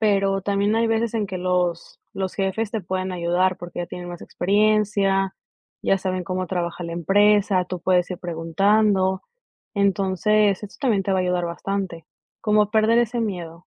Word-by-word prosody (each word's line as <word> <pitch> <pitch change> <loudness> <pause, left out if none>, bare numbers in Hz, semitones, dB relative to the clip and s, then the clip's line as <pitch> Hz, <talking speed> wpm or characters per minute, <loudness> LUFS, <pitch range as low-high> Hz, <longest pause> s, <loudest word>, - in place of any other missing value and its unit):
Pero 195 -2 +2
también 200 +2 +1
hay 230 0 +2
veces 225 0 0
en 215 -2 0
que 185 - -4
los 180 -2 -1
los 190 -1 -3
jefes 200 +2 -1
te 220 - -1
pueden 185 +1 -3
ayudar 180 +1 +1
porque 175 0 -8
ya 175 - -3
tienen 175 0 -8
más 175 -1 -8
experiencia, 200 -1 +1 0.5
ya 195 - +3
saben 185 -1 -2
cómo 185 +1 -2
trabaja 175 -1 -3
la 170 - -5
empresa, 200 +2 +3
tú 180 -1 -5
puedes 180 0 +2
ir 180 - -4
preguntando, 190 +3 +1 0.5
entonces 200 +1 +2
eso 205 - -9
también 225 -8 +2
te 195 - 0
va 190 - +2
a - - +1
ayudar 180 -1 0
bastante, 175 -1 -4 0.4
como 210 -1 +3
perder 220 +2 +4
ese 240 0 0
miedo. 175 -5 -5
195 Hz, 170 wpm, -23 LUFS, 180-210 Hz, 0.5 s, perder